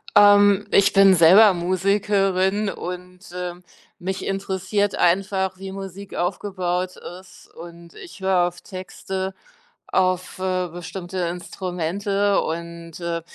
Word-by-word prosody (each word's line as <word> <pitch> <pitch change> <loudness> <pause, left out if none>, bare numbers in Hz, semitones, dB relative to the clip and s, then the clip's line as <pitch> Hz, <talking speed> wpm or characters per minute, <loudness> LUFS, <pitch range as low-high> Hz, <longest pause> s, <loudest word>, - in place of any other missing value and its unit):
Ähm, 205 0 +6
ich 200 +1 +4
bin 195 -1 +6
selber 190 +5 +7
Musikerin 195 +2 +1
und, 180 0 -7 0.2
ähm, 180 0 -6 0.4
mich 190 +1 -4
interessiert 195 +1 -1
einfach, 190 +1 +1
wie 190 0 -7
Musik 195 0 -8
aufgebaut 180 0 -2 0.2
ist 185 - -17
und 170 0 -12
ich 345 - -12
höre 185 -2 +2
auf 175 - -8
Texte, 190 0 -6 0.5
auf, 185 0 0
äh, 185 -1 -1
bestimmte 175 +2 -7
Instrumente 185 +3 -1
und, 170 0 -6
äh 170 -1 -3
185 Hz, 110 wpm, -22 LUFS, 175-195 Hz, 0.5 s, selber